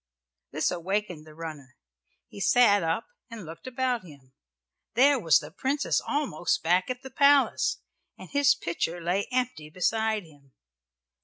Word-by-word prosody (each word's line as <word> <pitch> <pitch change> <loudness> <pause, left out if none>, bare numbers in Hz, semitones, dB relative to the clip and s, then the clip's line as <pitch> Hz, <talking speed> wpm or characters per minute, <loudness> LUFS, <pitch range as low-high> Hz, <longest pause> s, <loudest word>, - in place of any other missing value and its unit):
This - - 0
awakened 180 -2 -3
the 155 - -14
runner. 150 -5 -9 0.5
He - - -12
sat 205 -1 +4
up 165 +6 -1 0.2
and 225 -5 -9
looked 165 +9 -10
about 255 -2 -1
him. 140 -6 -16 0.6
There 275 +3 +5
was 165 -8 +5
the 150 0 -7
Princess 275 - 0
almost 285 - -1
back 180 +5 +2
at 255 +1 -5
the 265 - -9
palace, 280 +1 +3 0.4
and - - -11
his 285 0 +3
pitcher 170 -4 -3
lay 180 +4 -1
empty 250 -12 -2
beside 220 +5 0
him. 145 -5 -21
195 Hz, 145 wpm, -27 LUFS, 165-255 Hz, 0.6 s, There